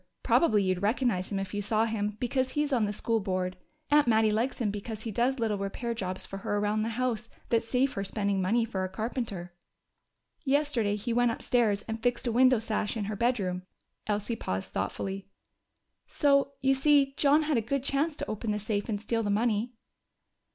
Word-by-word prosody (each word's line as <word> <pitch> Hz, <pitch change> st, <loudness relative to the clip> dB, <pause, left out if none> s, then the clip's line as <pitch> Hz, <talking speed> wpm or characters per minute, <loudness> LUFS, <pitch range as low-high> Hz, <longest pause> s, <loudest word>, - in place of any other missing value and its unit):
Probably 215 Hz, -11 st, +4 dB
you'd 185 Hz, -1 st, 0 dB
recognize 210 Hz, -3 st, +1 dB
him 200 Hz, -, -1 dB
if 195 Hz, 0 st, -4 dB
you 205 Hz, -, -1 dB
saw 215 Hz, +2 st, +1 dB
him, 210 Hz, -2 st, -2 dB
because 255 Hz, +1 st, 0 dB
he's 295 Hz, -1 st, 0 dB
on 235 Hz, -4 st, +3 dB
the 205 Hz, -, -1 dB
School 225 Hz, +2 st, 0 dB
Board. 185 Hz, -2 st, -2 dB, 0.4 s
Aunt 295 Hz, -3 st, +5 dB
Mattie 220 Hz, -1 st, +4 dB
likes 230 Hz, +5 st, 0 dB
him 220 Hz, -4 st, 0 dB
because 215 Hz, +1 st, -6 dB
he 225 Hz, -, -4 dB
does 245 Hz, +5 st, +1 dB
little 220 Hz, -4 st, 0 dB
repair 215 Hz, +4 st, -3 dB
jobs 185 Hz, -5 st, -4 dB
for 195 Hz, -, -7 dB
her 205 Hz, +1 st, -2 dB
around 210 Hz, +1 st, +1 dB
the 220 Hz, -, -1 dB
house 240 Hz, -3 st, -1 dB, 0.2 s
that 230 Hz, -1 st, +3 dB
save 255 Hz, +3 st, +1 dB
her 195 Hz, -, -2 dB
spending 200 Hz, -1 st, 0 dB
money 225 Hz, +5 st, +2 dB
for 195 Hz, -5 st, -3 dB
a 185 Hz, -, -2 dB
carpenter. 205 Hz, -4 st, -4 dB, 0.9 s
"Yesterday 270 Hz, -7 st, +1 dB
he 225 Hz, +3 st, -3 dB
went 245 Hz, 0 st, +3 dB
upstairs 225 Hz, -3 st, +1 dB
and 225 Hz, 0 st, -5 dB
fixed 245 Hz, +1 st, 0 dB
a 240 Hz, -, +1 dB
window 255 Hz, +2 st, +5 dB
sash 215 Hz, 0 st, -2 dB
in 210 Hz, -, -2 dB
her 210 Hz, +1 st, -3 dB
bedroom." 200 Hz, -6 st, 0 dB, 0.5 s
Elsie 210 Hz, +2 st, -1 dB
paused 95 Hz, -, -4 dB
thoughtfully. 190 Hz, -, -3 dB, 0.8 s
"So 280 Hz, -1 st, +2 dB
you 270 Hz, 0 st, +4 dB
see 275 Hz, 0 st, +4 dB
John 295 Hz, +3 st, +4 dB
had 300 Hz, -3 st, +1 dB
a -, -, +2 dB
good 255 Hz, +4 st, -2 dB
chance 285 Hz, +3 st, 0 dB
to -, -, -4 dB
open 215 Hz, +1 st, -3 dB
the 210 Hz, -, +1 dB
safe 210 Hz, +1 st, -2 dB
and 205 Hz, -2 st, -1 dB
steal 225 Hz, +2 st, -1 dB
the 210 Hz, -, -2 dB
money." 220 Hz, +2 st, +1 dB
225 Hz, 200 wpm, -29 LUFS, 205-250 Hz, 0.9 s, Aunt